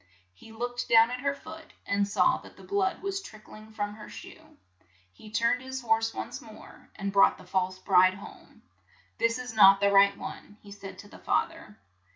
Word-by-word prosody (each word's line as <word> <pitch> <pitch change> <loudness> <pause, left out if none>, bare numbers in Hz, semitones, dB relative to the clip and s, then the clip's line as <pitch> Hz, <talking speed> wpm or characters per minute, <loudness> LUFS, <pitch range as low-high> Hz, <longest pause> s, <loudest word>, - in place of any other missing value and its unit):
He 160 - -16
looked 245 +2 -4
down 230 +1 +6
at 250 - -4
her 280 +2 -1
foot, 320 +3 -12
and 200 0 0
saw 200 - +2
that - - -16
the - - -14
blood 390 -2 -1
was 390 0 -3
trick 215 - -14
ling 215 +1 -13
from 205 -1 -4
her 215 0 -11
shoe. - - -13 0.6
He 215 - -14
turned 230 +3 +1
his 260 0 -6
horse 225 0 +1
once - - -6
more, - - -15
and 195 -1 -4
brought 200 - +5
the 185 - -15
false 185 0 -1
bride 185 -1 +4
home. 200 - -14 0.2
' - - -33
' - - -35
This 230 +1 +2
is 250 -2 -7
not 195 -2 +7
the 200 0 +3
right 200 0 +5
one," 205 - -9
he 205 - -13
said 195 -2 -10
to 205 - -12
the - - -14
fath - - 0
er. - - -15
215 Hz, 210 wpm, -28 LUFS, 200-245 Hz, 0.6 s, not